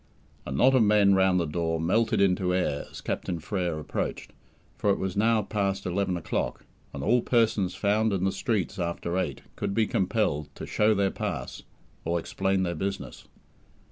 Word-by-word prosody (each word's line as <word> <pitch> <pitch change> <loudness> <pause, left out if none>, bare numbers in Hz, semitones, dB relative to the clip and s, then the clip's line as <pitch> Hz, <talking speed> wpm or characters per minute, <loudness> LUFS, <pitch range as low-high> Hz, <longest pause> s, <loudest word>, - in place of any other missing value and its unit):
A - - -5
knot 125 - +4
of 130 - +5
men 105 -2 +5
round 95 -1 +4
the 85 - 0
door 80 +1 -1
melted 110 +5 +2
into 90 -1 +2
air 80 -6 -1
as - - -10
Captain 90 - -3
Frere 90 -1 -2
approached, 75 - -4 0.4
for 105 - 0
it 100 - +3
was 95 -1 -3
now 110 +1 +3
past 100 -1 -1
eleven 90 0 0
o'clock, 85 - -3 0.3
and 70 - -6
all 120 +9 +3
persons 110 -7 +1
found 110 +2 +1
in 95 -2 -1
the 95 - +2
streets 100 -3 -2
after 85 0 -2
eight - - -3
could 100 - -3
be 115 - +3
compelled 90 -8 0
to - - -7
"show 105 0 +2
their 100 -1 +1
pass" - - -4 0.4
or 85 +1 0
explain 95 +2 0
their 85 -1 -1
business. 85 -6 -5
95 Hz, 175 wpm, -27 LUFS, 85-105 Hz, 0.4 s, of